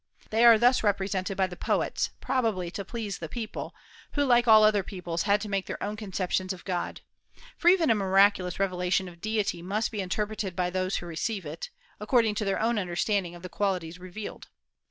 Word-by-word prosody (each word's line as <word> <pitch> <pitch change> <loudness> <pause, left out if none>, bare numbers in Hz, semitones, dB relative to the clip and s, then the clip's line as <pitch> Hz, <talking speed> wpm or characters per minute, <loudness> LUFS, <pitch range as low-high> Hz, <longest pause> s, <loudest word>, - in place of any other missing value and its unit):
They 225 +2 +3
are 230 -1 +9
thus 245 +3 +4
represented 195 -2 0
by 190 - +3
the 180 -1 -7
poets, - - 0
probably 225 -9 0
to 200 - -5
please 210 -1 -5
the 160 - -6
people, 225 +2 -6 0.4
who 290 - +1
like 240 -2 +4
all 220 -1 +8
other 215 -1 +4
peoples 175 -3 -4
had 205 +1 +5
to 215 - -4
make 195 -2 -2
their - - -5
own 210 +1 -3
conceptions 190 -2 -2
of 180 - -12
God; 180 -2 -3 0.5
for 345 - -3
even 350 -6 +6
a - - +6
miraculous 195 -2 +3
revelation 185 -1 0
of 170 -1 -13
deity 210 -5 -1
must 205 +5 -1
be 210 -3 -3
interpreted 205 0 -3
by 180 -1 0
those 185 +1 -1
who - - -3
receive 175 +4 -3
it, 150 +3 -6 0.3
according 220 0 +2
to 210 +1 -2
their 195 - 0
own 225 0 +1
understanding 180 0 -1
of 175 - -13
the - - -4
qualities 180 -3 -2
revealed. 185 +4 -8
195 Hz, 195 wpm, -28 LUFS, 180-215 Hz, 0.5 s, are